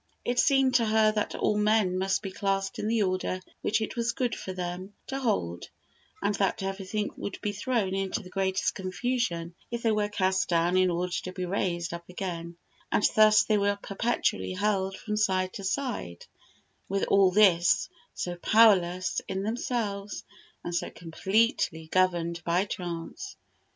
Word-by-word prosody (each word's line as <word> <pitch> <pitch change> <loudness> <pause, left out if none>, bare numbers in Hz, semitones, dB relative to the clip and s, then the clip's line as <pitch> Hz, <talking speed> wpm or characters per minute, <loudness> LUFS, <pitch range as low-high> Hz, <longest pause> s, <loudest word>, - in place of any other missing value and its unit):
It 245 0 0
seemed 270 -2 +4
to 235 - +4
her 215 0 +4
that 215 -1 -2
all 210 - +1
men 210 -3 +2
must 190 +2 0
be 195 - -4
classed 195 -1 -1
in 210 - -2
the 225 -1 +2
order 185 -1 -1 0.2
which 220 +1 +1
it 220 - -3
was 235 -1 0
good 245 -3 -1
for 190 - -5
them 185 +2 -5
to 270 - -4
hold; 145 - -1 0.5
and 200 +1 +2
that 195 -1 0
everything 195 +2 -3
would 200 - -5
be 210 - 0
thrown 205 -2 -1
into 195 +1 -2
the 180 - -12
greatest 190 0 0
confusion 185 -3 -2 0.2
if 235 0 -4
they 225 - +3
were 210 -1 +1
cast 190 -2 +1
down 170 +1 +2
in 185 0 +4
order 175 +1 -1
to 185 - -4
be 185 -1 -4
raised 175 -2 -1
up 170 0 -8
again, 170 -2 -5 0.3
and - - +2
thus 215 -1 +7
they 215 -1 +2
were 200 0 +1
perpetually 195 - -1
hurled 195 - 0
from 210 -1 -3
side 185 -3 +1
to 195 - -7
side; 190 - -3 0.6
with 195 0 0
all 195 -1 +5
this, 180 -3 +4 0.3
so 175 -1 -3
powerless 185 -3 +4
in 190 0 -3
themselves, 210 -3 -3 0.4
and 175 - -4
so 170 - -1
completely 185 - 0
governed 175 -2 +1
by 175 +3 +1
chance! 180 - -6
195 Hz, 165 wpm, -28 LUFS, 180-215 Hz, 0.6 s, thus